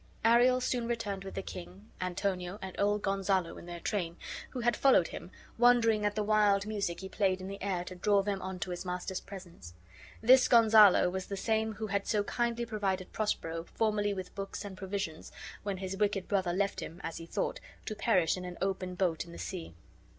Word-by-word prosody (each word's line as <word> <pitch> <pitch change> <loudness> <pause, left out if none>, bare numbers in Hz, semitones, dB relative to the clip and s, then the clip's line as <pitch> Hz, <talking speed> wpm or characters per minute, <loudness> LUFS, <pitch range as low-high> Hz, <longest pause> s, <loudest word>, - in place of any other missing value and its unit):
Ariel 245 +2 +5
soon 245 -2 -1
returned 210 -5 -3
with 195 - -8
the 195 - -3
king, 190 +5 -9
Antonio, 185 0 -2
and 190 -1 -7
old 205 +1 +2
Gonzalo 195 -3 0
in - - -12
their 175 0 -6
train, 175 -3 -2 0.3
who 255 - -5
had 240 0 +2
followed 260 -11 +4
him, 170 - -8 0.3
wondering 230 -3 +5
at 205 - -3
the 215 - 0
wild 205 -1 +3
music 200 -5 -2
he 190 - -5
played 190 -1 +1
in 185 - -6
the 200 +1 -7
air 190 -3 -1
to 185 - -8
draw 200 +2 +2
them 200 -1 -2
on 190 0 -5
to 185 - -3
his 175 - -4
master's 180 +1 -3
presence. 175 - -11 0.4
This 255 +3 +6
Gonzalo 220 -6 +7
was 190 0 -4
the 200 - -4
same 220 +2 0
who 215 +1 -5
had 200 -1 -1
so 210 -2 +2
kindly 235 +2 -1
provided 195 -5 -2
Prospero 165 -6 -2
formerly 210 -2 +1
with 185 -1 -6
books 195 +1 -5
and 200 -2 -7
provisions, 190 -5 -4 0.3
when 200 -2 -3
his 190 0 -4
wicked 200 -2 0
brother 190 -4 +1
left 195 +2 0
him, 170 - -7
as 165 - -4
he 165 - -8
thought, - - -2 0.3
to - - -3
perish 190 -6 +2
in 180 - -6
an 180 -1 -7
open 190 -1 -2
boat 180 -4 0
in 170 - -12
the - - -9
sea. 170 - -6
195 Hz, 205 wpm, -31 LUFS, 185-215 Hz, 0.4 s, Gonzalo